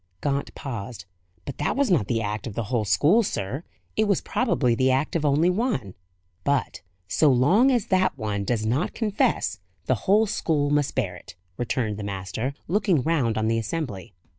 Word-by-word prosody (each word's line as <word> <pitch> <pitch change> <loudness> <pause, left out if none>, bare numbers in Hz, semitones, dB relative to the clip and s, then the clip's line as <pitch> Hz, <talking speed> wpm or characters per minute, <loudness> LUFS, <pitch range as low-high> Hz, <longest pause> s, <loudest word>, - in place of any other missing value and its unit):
Gaunt 140 +5 -2
paused. 115 - -6 0.4
"But 140 - -7
that 150 - 0
was 275 -5 +1
not 135 - +2
the 115 -1 0
act 105 +3 -3
of 105 - -7
the 115 - -1
whole 110 -3 +1
school, 150 - +4
sir. 135 - -3 0.3
It 215 - +2
was 200 -3 +2
probably 125 -4 +1
the 130 +3 +2
act 135 +5 0
of 165 - 0
only 150 +5 +3
one." 180 - -1 0.5
"But, 140 -5 0 0.3
so 120 +10 +3
long 170 - +4
as 240 -5 +2
that 185 -6 +2
one 105 -4 -2
does 110 0 -1
not 125 +10 0
confess, 210 - 0 0.3
the 125 -6 -1
whole 215 +3 +5
school 150 -7 0
must 145 -1 +1
bear 100 -9 -1
it," 90 - -13 0.2
returned 115 -2 -2
the 105 - -5
master, 100 +7 -4
looking 185 - +2
round 140 -9 +1
on 110 0 0
the 115 0 +1
assembly. 110 - -5
130 Hz, 185 wpm, -25 LUFS, 110-165 Hz, 0.5 s, whole